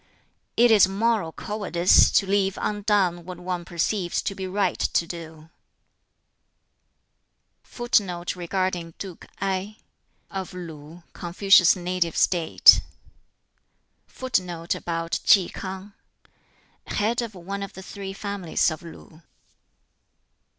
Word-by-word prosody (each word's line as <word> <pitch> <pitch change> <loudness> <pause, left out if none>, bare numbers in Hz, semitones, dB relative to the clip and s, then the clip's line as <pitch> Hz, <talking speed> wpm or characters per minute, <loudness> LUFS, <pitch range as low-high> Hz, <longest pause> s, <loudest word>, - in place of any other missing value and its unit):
"It 240 0 +6
is 205 -4 +7
moral 205 -3 0
cowardice 185 -3 +3
to 195 - +3
leave 195 0 +1
undone 200 -4 0
what 180 0 -8
one 180 -1 -4
perceives 175 +1 -2
to - - -2
be 190 -1 -5
right 190 -1 -1
to 170 - +1
do." 160 -1 -10 2.1
[Footnote 190 -8 -1
2: 180 0 -4 1.1
Of 190 -2 -5
Lu 165 -1 -10
(Confucius's 180 +1 +4
native 180 -2 -2
State).] 170 -3 +5 1.3
[Footnote 180 -10 -2 0.4
3: 190 -4 +4 1.3
Head 225 +4 0
of 230 -4 -6
one 195 +3 -6
of 200 - -6
the 190 - -10
"Three 195 0 -7
Families" 195 -4 -1
of 155 - -7
Lu. 165 -1 -13
185 Hz, 95 wpm, -24 LUFS, 170-200 Hz, 2.1 s, is